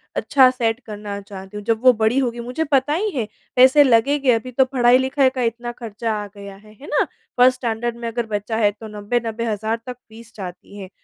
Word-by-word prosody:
अच्छा 265 -2 +4
सेट 230 -2 -1
करना 205 -1 -6
चाहती 195 0 -10
हूँ। 210 - -7
जब 230 0 0
वो 255 - +8
बड़ी 220 +3 +1
होगी 240 -3 -2
मुझे 250 +6 -3
पता 275 +2 +2
ही 420 +6 0
है 225 - -1 0.3
पैसे 260 +3 +7
लगेंगे। 270 +2 +3
अभी 230 +3 -3
तो 265 +2 +3
पढ़ाई-लिखाई 260 +1 +3
का 260 -1 -5
इतना 240 +1 -2
ख़र्चा 230 -1 -4
आ - - -7
गया 200 -1 -10
है, 215 +2 -18
है 275 +8 -14
ना। - - +2 0.3
फर्स्ट 255 +1 +5
स्टैंडर्ड 235 -1 -2
में 235 0 -5
अगर 235 0 -2
बच्चा 215 +1 -3
है 210 -2 +3
तो 220 +2 -11
90-90,000 220 0 -2
तक 250 -1 -6
फ़ीस 230 +1 -14
जाती 185 0 -9
है। 190 -2 -8
230 Hz, 205 wpm, -21 LUFS, 215-255 Hz, 0.3 s, वो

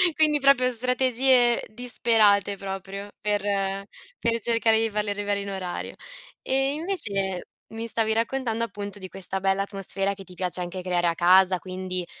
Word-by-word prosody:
quindi 305 -2 +3
proprio 265 -2 +4
strategie 250 0 +3
disperate 215 -4 +2
proprio, 195 +1 -6
per 205 -1 0 0.8
per 230 0 +1
cercare 225 -1 +3
di 225 0 +1
farli 210 0 -2
arrivare 205 0 -1
in 200 - -6
orario. 185 -2 -5 0.5
E 270 +1 +1
invece 205 - -2 0.3
mi 225 +1 -5
stavi 220 -1 0
raccontando, 230 0 -1
appunto, 205 -2 -7
di 190 - -7
questa 190 0 -4
bella 195 0 +1
atmosfera 195 0 -2
che 195 0 -11
ti 180 - -14
piace 180 0 -2
anche 180 +1 -4
creare 175 -1 0
a 165 - +1
casa, 185 +1 +5
quindi 185 -1 -4
205 Hz, 150 wpm, -25 LUFS, 190-235 Hz, 0.8 s, casa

